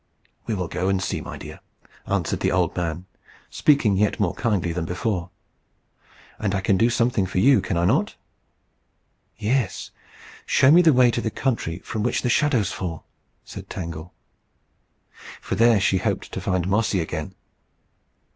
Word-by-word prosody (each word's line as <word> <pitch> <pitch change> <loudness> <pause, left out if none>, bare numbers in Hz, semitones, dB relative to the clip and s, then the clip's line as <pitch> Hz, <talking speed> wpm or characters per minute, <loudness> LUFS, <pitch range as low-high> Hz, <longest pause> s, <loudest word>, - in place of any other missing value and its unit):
"We 110 - -1
will 90 -3 -3
go 90 +3 -2
and 95 -1 +1
see, 95 - -3
my - - -8
dear," - - -10 0.5
answered - - -1
the - - 0
old - - +1
man, 85 0 -3 0.5
speaking 125 -10 +3
yet 105 +1 +1
more 100 -5 +1
kindly 100 -8 -1
than 85 0 -3
before. 90 +1 -2 1.1
"And 100 -2 -1
I - - +1
can 95 +1 +2
do 115 +5 +3
something 115 -4 +1
for 95 - -5
you, 130 +7 +5
can 90 - -2
I 85 - +1
not?" - - +1 1.2
"Yes 115 -1 -1 0.6
show 130 - +5
me 175 +3 +7
the 165 -2 +5
way 125 -2 +5
up - - -2
to 120 - -1
the 110 - -1
country 110 -9 -2
from 110 - -3
which 120 +3 0
the 125 - +1
shadows 125 -8 +2
fall," 85 -4 -5 0.4
said - - -10
Tangle. 85 -1 -6 1.3
For - - -5
there 115 +2 +4
she 95 0 +2
hoped - - -2
to 95 - -5
find 90 -3 -1
Mossy 100 0 +1
again. 80 +2 -4
100 Hz, 165 wpm, -23 LUFS, 90-115 Hz, 1.3 s, me